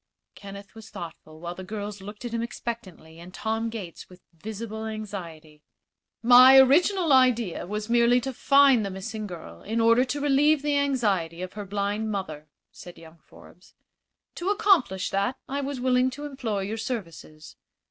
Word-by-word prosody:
Kenneth 200 -1 -11
was 220 -1 -13
thoughtful, 155 -2 -10
while 170 +1 -6
the 185 - -9
girls 205 0 -6
looked 205 +4 -10
at 235 - -5
him 230 - -1
expectantly 210 -8 -7
and 175 +2 -11
Tom 225 +2 -2
Gates 200 -7 -8
with 180 0 -16
visible 220 +5 -7
anxiety. 170 -8 -8 0.6
"My 255 +2 +8
original 320 +5 +4
idea 240 -9 +2
was 210 +2 -4
merely 240 +1 +4
to 265 +2 -4
find 275 -2 +4
the 200 - -3
missing 210 +3 -6
girl 175 -4 -10
in 225 +3 -3
order 230 +2 +4
to 275 +3 -3
relieve 290 +1 +3
the 295 -1 0
anxiety 205 -12 0
of 185 - -7
her 210 -1 -7
blind 205 +2 -2
mother," 155 -7 -5 0.2
said 175 - -13
young 165 0 -15
Forbes. 180 +3 -19 0.6
"To 350 +3 -2
accomplish 385 - +2
that 200 +7 -1
I 280 +1 -3
was 275 -1 -4
willing 250 0 +2
to 295 - -6
employ 240 -8 -3
your 205 +3 -4
services. 165 - -7
220 Hz, 165 wpm, -25 LUFS, 190-255 Hz, 0.6 s, My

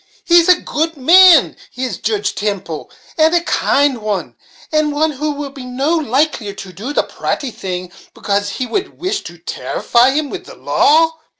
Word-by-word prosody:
He's 340 0 +5
a 360 - +6
good 325 +1 -2
man 340 +2 +6 0.2
is 250 -6 -4
Joodge 205 -2 -1
Temple, 200 -7 -4 0.3
and 320 +2 +4
a 345 - +3
kind 285 -6 +1
one, 210 -2 -3 0.4
and 305 -1 +1
one 310 +2 +1
who 300 +2 -3
will 285 -1 -6
be 275 -2 -10
no 270 +6 -1
the 285 - -8
likelier 260 -6 0
to 195 -2 -10
do 215 - -6
the - - +1
pratty 270 -4 -4
thing, 180 -3 -6 0.2
becase 200 0 -2
ye 255 - -1
would 385 +8 -4
wish 385 +3 -2
to - - -9
tarrify 240 +2 +1
him 290 +1 -1
wid - - -7
the - - -12
law. 320 +1 +2
280 Hz, 180 wpm, -16 LUFS, 215-315 Hz, 0.4 s, a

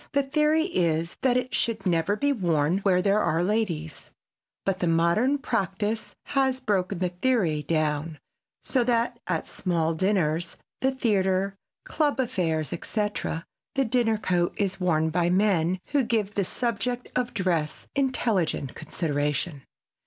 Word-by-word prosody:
The 280 0 +3
theory 300 +3 +2
is 170 - 0
that 255 -2 +3
it 250 0 -2
should 230 -2 -1
never 170 +2 +2
be 285 +6 +1
worn 170 - +1
where 185 -2 +2
there 200 +1 +3
are 170 -3 +1
ladies, 175 -7 -2 0.6
but 195 -1 0
the 175 - 0
modern 170 +12 +3
practise 210 - -2
has 265 -2 +1
broken 200 -6 0
the 180 0 0
theory 180 -5 +1
down 155 0 -1 0.5
so 255 -3 +1
that 235 -1 +1
at - - -1
small 165 -3 -1
dinners, 170 -2 0 0.2
the 265 - +2
theater, 195 -6 +1 0.3
club 295 -3 0
affairs, 165 - 0
etc., 205 -2 -2 0.3
the 270 0 +2
dinner 225 -2 +2
coat 175 -4 0
is 195 -2 -1
worn 160 -3 +1
by 175 +1 +2
men 185 -2 +2
who 285 -1 +3
give 215 -4 0
the 200 -2 0
subject 245 +3 -2
of 245 -1 -1
dress 170 -5 -1
intelligent 225 - 0
consideration. 145 -1 -2
190 Hz, 140 wpm, -26 LUFS, 170-235 Hz, 0.6 s, The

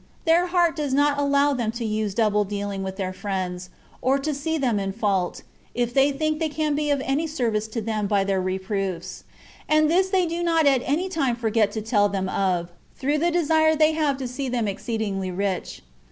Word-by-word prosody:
Their 340 +2 +4
heart 345 -2 +2
does 290 -4 -1
not 285 0 +2
allow 285 0 +3
them 235 -4 -1
to 235 0 -4
use 215 -2 -2
double 210 -2 +2
dealing 200 -1 -4
with 190 0 -4
their 190 -1 -3
friends, 185 -2 -4 0.3
or 265 +2 +2
to 295 +2 -2
see 320 +3 -2
them 245 -8 +1
in 195 -1 -3
fault, 195 -4 -1 0.3
if 240 0 -1
they 275 +2 +4
think 310 +2 -1
they 320 -1 0
can 305 0 -1
be 295 0 -1
of 285 -2 +1
any 290 +5 0
service 230 -8 -1
to 225 +1 -4
them 215 -1 -2
by 200 -1 +2
their 195 -1 0
reproofs; 190 -1 -3 0.4
and 310 0 +4
this 375 +2 +3
they 375 -2 +2
do 335 +1 -3
not 330 -2 +2
at 270 -3 +4
any 315 +7 0
time 280 -9 0
forget 220 -3 +1
to 220 - -3
tell 205 -2 +2
them 195 -1 -2
of, 180 -3 0 0.2
through 290 +3 0
the 340 +3 +2
desire 315 -2 +3
they 310 0 +4
have 305 -3 0
to 265 -2 -4
see 255 +2 -4
them 240 -3 -1
exceeding 205 0 -3 0.2
rich. 195 -2 -3
245 Hz, 210 wpm, -24 LUFS, 205-305 Hz, 0.4 s, Their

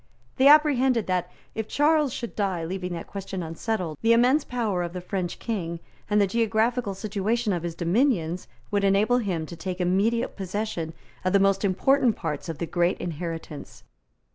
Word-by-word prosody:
They 265 - +5
apprehended 265 -6 +5
that, 180 -1 -1 0.2
if 220 -1 -4
Charles 295 0 +3
should 235 0 -6
die 190 -5 -1
leaving 180 +1 -4
that 170 - -5
question 195 -2 -5
unsettled, 165 -1 -3
the 230 +1 +5
immense 255 +6 +4
power 220 -7 -1
of 175 -1 -4
the 180 - -4
French 180 -1 -3
King 170 -7 -3 0.3
and 210 0 +3
the 200 - +5
geographical 225 +1 0
situation 210 +2 -1
of 175 - -2
his 170 -1 -4
dominions 180 - +1 0.2
would 205 -1 +1
enable 205 +5 +3
him 180 -8 -2
to 170 - -9
take 185 +2 -5
immediate 200 +7 +1
possession 190 -4 -3 0.3
of 185 +1 0
the 200 - +6
most 195 +1 +2
important 235 +5 +3
parts 160 -1 -4
of 160 - -4
the 170 - -2
great 175 +2 +1
inheritance. 165 -2 -6
195 Hz, 170 wpm, -26 LUFS, 175-230 Hz, 0.3 s, the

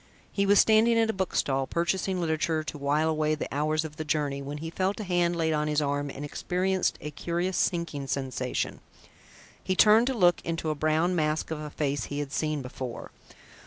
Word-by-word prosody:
He 200 -1 0
was 205 +1 +5
standing 225 +2 +5
at 225 -1 +3
a - - -10
bookstall, 135 -8 0
purchasing 180 +4 0
literature 160 -1 0
to 155 - -6
while 145 +3 +1
away 155 -1 +1
the 150 - -4
hours 155 +2 0
of 150 -1 -8
the 155 - -3
journey, 145 -2 -1
when 140 +2 -5
he 165 +2 -6
felt 190 +4 -1
a - - -3
hand 175 -2 +1
laid 160 -1 +1
on 150 0 0
his 150 0 +1
arm 145 -1 -1
and 140 +1 -6
experienced 185 +5 -1
a 150 - -5
curious 175 +5 -2
sinking 170 -6 -1
sensation. 130 -2 -2 0.8
He 185 - 0
turned 220 +5 +6
to 265 - 0
look 175 -5 +4
into 165 -1 -2
a - - +1
brown 155 +4 +1
mask 155 -1 0
of 160 - -3
a 150 0 -6
face 145 -1 -2
he 145 - -5
had 145 -1 -3
seen 155 -2 -1
before. 125 -1 -7
155 Hz, 200 wpm, -28 LUFS, 145-180 Hz, 0.8 s, turned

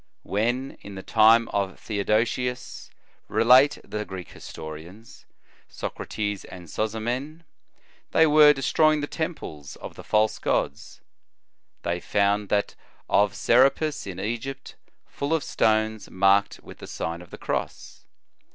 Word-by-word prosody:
"When, 120 +6 -2
in 100 - -10
the 95 - -8
time 115 +1 +5
of 100 -2 -2
Theodosius," 115 +4 -1 0.4
relate 130 +5 +5
the 105 0 -4
Greek 95 -3 -8
historians, 85 +8 -11 0.4
Socrates 105 -2 -4
and 90 -2 -11
Sozomen, 120 - -3 0.3
" - - -34
they 160 - +5
were 150 -1 +7
destroy 150 +3 +3
ing 150 - -1
the - - -1
temples 145 - -6
of - - -9
the - - -11
false 110 0 +1
gods, - - -2 0.8
they 85 0 -1
found 100 +2 +1
that 100 -1 0 0.4
of 100 -2 +3
Serapis, 135 +3 +2
in 95 -2 -6
Egypt, 120 +6 -5 0.3
full 145 +3 -2
of 160 - -2
stones 110 -1 0
marked 100 +2 +2
with - - -13
the - - -9
Sign 85 +1 -4
of 90 - -14
the - - -10
Cross. - - -5
110 Hz, 135 wpm, -25 LUFS, 100-130 Hz, 0.8 s, were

